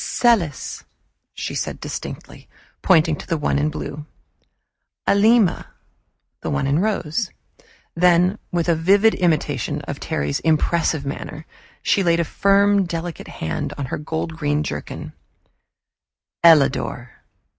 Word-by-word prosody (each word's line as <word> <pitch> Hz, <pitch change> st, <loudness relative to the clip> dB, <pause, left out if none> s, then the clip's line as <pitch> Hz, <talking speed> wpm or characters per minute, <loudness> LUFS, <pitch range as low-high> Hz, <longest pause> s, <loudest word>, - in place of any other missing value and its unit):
"Celis," 200 Hz, -, +1 dB, 0.5 s
she -, -, -4 dB
said -, -, -3 dB
distinctly, -, -, -8 dB, 0.3 s
pointing 160 Hz, -1 st, +4 dB
to -, -, -10 dB
the 165 Hz, -, 0 dB
one 150 Hz, -1 st, 0 dB
in 150 Hz, +1 st, +1 dB
blue; 150 Hz, 0 st, -6 dB, 1.0 s
"Alima" 210 Hz, -2 st, +3 dB, 0.7 s
the -, -, -4 dB
one 70 Hz, -, 0 dB
in 140 Hz, +3 st, +2 dB
rose; 190 Hz, -1 st, -1 dB, 0.6 s
then, 180 Hz, +3 st, +3 dB
with 170 Hz, -1 st, 0 dB
a 170 Hz, -, +4 dB
vivid 195 Hz, +7 st, +4 dB
imitation 170 Hz, -4 st, 0 dB
of -, -, -6 dB
Terry's 70 Hz, 0 st, -2 dB
impressive 160 Hz, -1 st, +1 dB
manner, 150 Hz, +2 st, -6 dB, 0.4 s
she 200 Hz, -, +2 dB
laid 170 Hz, -2 st, +2 dB
a -, -, +3 dB
firm 200 Hz, +2 st, +3 dB
delicate 170 Hz, 0 st, -5 dB
hand 80 Hz, -, -4 dB
on 140 Hz, -, -3 dB
her -, -, -2 dB
gold 160 Hz, +2 st, -4 dB
green 150 Hz, -1 st, 0 dB
jerkin -, -, -6 dB, 1.3 s
"Ellador." 140 Hz, -6 st, +4 dB
165 Hz, 125 wpm, -21 LUFS, 150-190 Hz, 1.3 s, pointing